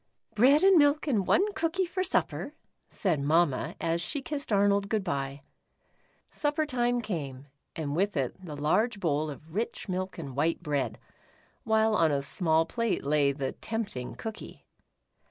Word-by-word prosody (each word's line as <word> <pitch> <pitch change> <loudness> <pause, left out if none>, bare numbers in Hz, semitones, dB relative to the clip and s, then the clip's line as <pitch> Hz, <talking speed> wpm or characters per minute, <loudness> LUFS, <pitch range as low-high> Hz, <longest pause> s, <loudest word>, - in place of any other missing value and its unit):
" - - -39
Bread 275 - +5
and 385 -3 +7
milk 290 +1 +3
and 220 - 0
one 405 +3 +3
cookie 335 +2 0
for 370 +1 -2
supper," 370 - -1 0.3
said 175 -7 0
Mamma, 150 -1 +1
as 165 +1 0
she 285 - -2
kissed 290 -4 -5
Arnold 200 0 +3
good 215 -3 0
bye. 140 -4 -3 0.9
Supper 295 +1 0
time 245 -3 0
came, 145 - -5 0.3
and 150 -3 -3
with 195 0 0
it 130 -3 -1
the 155 -5 -7
large 205 +10 +1
bowl 155 -3 0
of 155 +2 -10
rich 220 +3 -3
milk 185 0 -3
and 140 -6 -7
white 165 +5 0
bread, 140 -7 -1 0.7
while 220 0 +3
on 165 -6 +3
a 140 -1 0
small 160 +1 +2
plate 230 +5 -1
lay 145 -1 +3
the 135 -1 -3
tempting 205 - -5
cookie. 220 -1 -8
185 Hz, 160 wpm, -29 LUFS, 150-240 Hz, 0.9 s, and